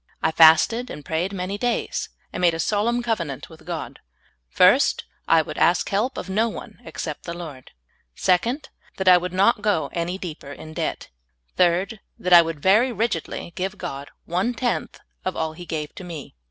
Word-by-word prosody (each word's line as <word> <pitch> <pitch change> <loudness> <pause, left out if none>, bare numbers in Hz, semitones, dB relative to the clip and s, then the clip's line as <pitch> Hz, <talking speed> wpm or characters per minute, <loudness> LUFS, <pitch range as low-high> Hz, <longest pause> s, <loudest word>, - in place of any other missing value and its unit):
I 160 - +3
fasted 165 +10 +5
and 145 - -8
prayed 170 +4 -1
many 195 +1 -4
days, 245 -1 -1 0.2
and - - -4
made 170 -2 +4
a - - -5
solemn 230 +6 +1
cov 225 -3 0
enant 145 -6 -6
with 160 -1 -15
God: 170 -3 -5 0.5
First, - - +4 0.2
I 165 -1 +5
would - - -7
ask 175 - +3
help 225 +7 0
of - - -5
no 215 +4 +1
one 220 0 -9
ex - - -6
cept 150 -3 -6
the 170 - -4
Eord. 150 -7 -9 0.5
Second, 235 - +1 0.3
that 190 - -3
I 180 -1 +8
w^ould 180 0 -4
not 205 +5 +3
go 205 -6 0
any 175 +2 -2
deeper 160 -6 -7
in 155 +2 -10
debt. - - -3 0.5
Third, 180 +5 +2 0.2
that 180 0 +1
I 170 - +11
would 165 -3 -5
very 220 +7 +4
rigidly 210 -6 -3
give 190 +3 -3
God 140 -3 -6 0.2
one 185 +8 -1
tenth 240 +1 -2 0.2
of 185 - -2
all 160 -1 -2
He 175 +1 -10
gave 150 -2 -4
to - - -9
me. 165 -6 -8
180 Hz, 190 wpm, -23 LUFS, 165-210 Hz, 0.5 s, I